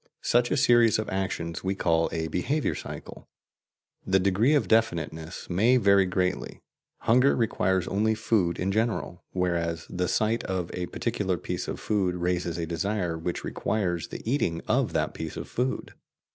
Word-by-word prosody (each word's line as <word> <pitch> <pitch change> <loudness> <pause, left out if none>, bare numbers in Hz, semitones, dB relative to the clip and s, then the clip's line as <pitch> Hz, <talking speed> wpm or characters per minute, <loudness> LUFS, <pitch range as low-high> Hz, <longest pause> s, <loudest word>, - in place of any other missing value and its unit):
Such 120 0 +3
a - - +1
series 120 -3 +5
of 110 - -3
actions 95 -3 -3
we 95 +1 -1
call 80 -3 +2
a 80 -1 -2
"behaviour 140 - 0
cycle." - - -9 0.7
The 95 - +3
degree 100 +9 +3
of 145 - +2
definiteness 85 -7 0
may 110 +8 +4
vary 100 -4 +4
greatly: 90 0 -1 0.4
hunger 125 +4 +4
requires 95 -5 +1
only 110 +3 +1
food 105 -6 +1
in 95 +2 -1
general, 110 -5 -1
whereas 85 -2 -1
the 90 0 -1
sight 110 +4 +1
of 90 -3 -2
a 90 -1 -3
particular - - -1
piece - - -4
of - - -4
food 95 -4 0
raises 90 -1 -1
a 85 - -2
desire 85 +1 -1
which 85 +2 -4
requires 90 -7 -1
the - - -8
eating 100 - 0
of - - +1
that - - 0
piece 80 -1 -6
of - - -5
food. 125 +2 -2
95 Hz, 160 wpm, -27 LUFS, 85-110 Hz, 0.7 s, series